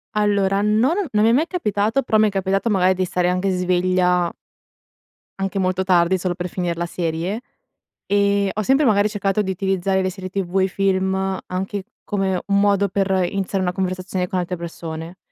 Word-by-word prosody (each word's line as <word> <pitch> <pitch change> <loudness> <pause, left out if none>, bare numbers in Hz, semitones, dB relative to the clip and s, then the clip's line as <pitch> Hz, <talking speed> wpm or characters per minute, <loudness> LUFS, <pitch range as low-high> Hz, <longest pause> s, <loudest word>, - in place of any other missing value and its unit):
Allora, 200 -2 +2
non 220 - +2
ho 405 - 0
non 210 0 +2
mi 225 - +5
è - - +4
mai 305 +7 +2
capitato, 220 - 0
però 220 -4 +1
mi 215 0 +5
è - - -1
capitato 195 +3 0
magari 190 -3 +3
di 185 0 0
stare 180 0 0
anche 185 +2 0
sveglia 180 -1 +1 1.1
anche 195 0 -2
molto 185 0 0
tardi, 180 0 +3
solo 180 0 -2
per 175 0 -4
finire 175 -1 -2
la 170 +1 -3
serie 170 +5 -3 0.6
e 200 -1 +2
ho 215 - -2
sempre 270 +7 +3
magari 205 -3 +4
cercato 205 -1 0
di 190 -2 -2
utilizzare 190 0 0
le 185 - 0
serie 185 0 -7
TV 190 0 -1
e - - +3
i - - 0
film 190 0 0
anche 190 +2 -4 0.2
come 195 -3 -1
un 200 0 +2
modo 200 0 +3
per 195 0 0 0.2
iniziare 195 -1 -2
una 180 - 0
conversazione 185 0 -2
con 185 - -1
altre 180 0 -3
persone, 165 0 -7
190 Hz, 190 wpm, -21 LUFS, 180-200 Hz, 1.1 s, mi